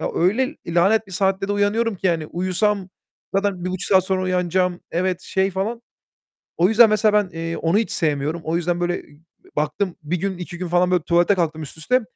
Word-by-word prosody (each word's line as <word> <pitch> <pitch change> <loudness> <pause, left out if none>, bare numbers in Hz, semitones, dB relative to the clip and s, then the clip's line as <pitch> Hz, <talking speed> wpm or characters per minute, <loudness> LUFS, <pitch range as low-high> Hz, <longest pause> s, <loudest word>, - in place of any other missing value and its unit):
Ya, - - -1
öyle 235 - +2
l 170 - -5
lanet 200 +5 +3
bir 190 - -13
saatte 195 +1 0
de - - +1
uyanıyorum 205 +3 +1
ki 190 - -2
yani 165 -3 0
uyusam 185 +3 0 0.5
zaten 195 -3 0
1,5 185 0 -3
saat 185 -1 +5
sonra 190 0 0
uyanacağım, 180 0 0
evet, 180 +1 -1
şey 190 +1 0
falan. 210 +5 -3 0.7
O 175 +2 +4
yüzden 225 +1 +6
mesela 215 0 +3
ben, 210 -2 +3
eee, 165 0 -3
onu 165 +6 +1
hiç 225 - -1
sevmiyorum. 150 +1 -1
O 165 +1 -1
yüzden 175 0 -1
böyle 175 0 -1 0.5
baktım 155 +5 -1
1 155 +4 -1
gün, 190 +1 -3
2 175 -1 -7
gün 180 0 -4
falan 180 +1 +2
böyle 180 -2 +2
tuvalete 175 +4 +3
kalktım 160 -4 -1
üst 155 +2 -9
üste. 250 +11 +1
185 Hz, 200 wpm, -22 LUFS, 170-200 Hz, 0.7 s, yüzden